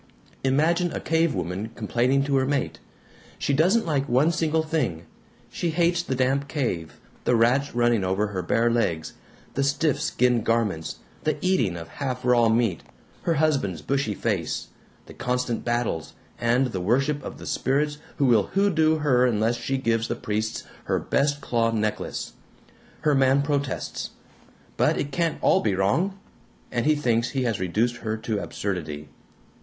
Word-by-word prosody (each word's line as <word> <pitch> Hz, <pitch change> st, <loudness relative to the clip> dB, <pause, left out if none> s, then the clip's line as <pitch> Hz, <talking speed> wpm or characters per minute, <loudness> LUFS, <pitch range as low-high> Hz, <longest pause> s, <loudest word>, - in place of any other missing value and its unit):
Imagine 160 Hz, +6 st, +2 dB
a -, -, -2 dB
cavewoman 115 Hz, -, -1 dB
complaining 125 Hz, +5 st, +1 dB
to 140 Hz, 0 st, 0 dB
her 130 Hz, 0 st, +1 dB
mate. 140 Hz, -1 st, -1 dB, 0.6 s
She 140 Hz, -, 0 dB
doesn't 180 Hz, +11 st, +3 dB
like 145 Hz, -4 st, 0 dB
one 135 Hz, +7 st, +4 dB
single 160 Hz, -1 st, +1 dB
thing; 150 Hz, -, -1 dB, 0.5 s
she 175 Hz, -, -2 dB
hates 170 Hz, +1 st, +2 dB
the 135 Hz, -6 st, -3 dB
damp 135 Hz, +2 st, +1 dB
cave, 105 Hz, -, -3 dB, 0.2 s
the 125 Hz, -, +3 dB
rats 125 Hz, +4 st, +2 dB
running 120 Hz, -3 st, +3 dB
over 95 Hz, +3 st, +1 dB
her 95 Hz, -2 st, -3 dB
bare 115 Hz, +5 st, +2 dB
legs, 85 Hz, -10 st, 0 dB, 0.4 s
the 140 Hz, -, 0 dB
stiff 140 Hz, +1 st, +1 dB
skin 125 Hz, -2 st, +2 dB
garments, 110 Hz, -8 st, 0 dB, 0.3 s
the 155 Hz, -1 st, 0 dB
eating 125 Hz, -, +1 dB
of 85 Hz, -1 st, -7 dB
half 125 Hz, -, -4 dB
raw 120 Hz, -2 st, +4 dB
meat, 110 Hz, -6 st, +1 dB, 0.4 s
her 170 Hz, -, +1 dB
husband's 140 Hz, -, +1 dB
bushy 135 Hz, -7 st, 0 dB
face, 95 Hz, -8 st, -2 dB, 0.4 s
the -, -, -12 dB
constant 125 Hz, -1 st, -2 dB
battles, 120 Hz, -9 st, -1 dB, 0.3 s
and 125 Hz, +2 st, +2 dB
the 95 Hz, -, -3 dB
worship 135 Hz, +8 st, +1 dB
of -, -, -7 dB
the -, -, -10 dB
spirits 145 Hz, +2 st, 0 dB, 0.2 s
who 140 Hz, -, +2 dB
will 115 Hz, -6 st, +4 dB
hoodoo 165 Hz, -6 st, +3 dB
her 130 Hz, -5 st, +3 dB
unless 115 Hz, 0 st, +1 dB
she 135 Hz, +3 st, -2 dB
gives 115 Hz, -3 st, 0 dB
the -, -, -2 dB
priests 110 Hz, +1 st, -2 dB, 0.2 s
her -, -, +1 dB
best 145 Hz, +1 st, 0 dB
claw 115 Hz, -3 st, +1 dB
necklace. 110 Hz, -2 st, -2 dB, 0.7 s
Her 150 Hz, -2 st, +3 dB
man 135 Hz, +1 st, +4 dB
protests, 140 Hz, -2 st, -2 dB, 0.7 s
'But -, -, +3 dB
it 145 Hz, -, -2 dB
can't 165 Hz, +3 st, 0 dB
all -, -, +4 dB
be 105 Hz, -3 st, +1 dB
wrong!' 155 Hz, -, +1 dB, 0.5 s
and 120 Hz, +2 st, 0 dB
he 155 Hz, -, +5 dB
thinks 120 Hz, -5 st, +1 dB
he 135 Hz, -2 st, -1 dB
has 115 Hz, -4 st, 0 dB
reduced 110 Hz, +7 st, 0 dB
her 110 Hz, -1 st, -3 dB
to 110 Hz, -1 st, -2 dB
absurdity. 75 Hz, -7 st, -4 dB
125 Hz, 160 wpm, -25 LUFS, 110-145 Hz, 0.7 s, he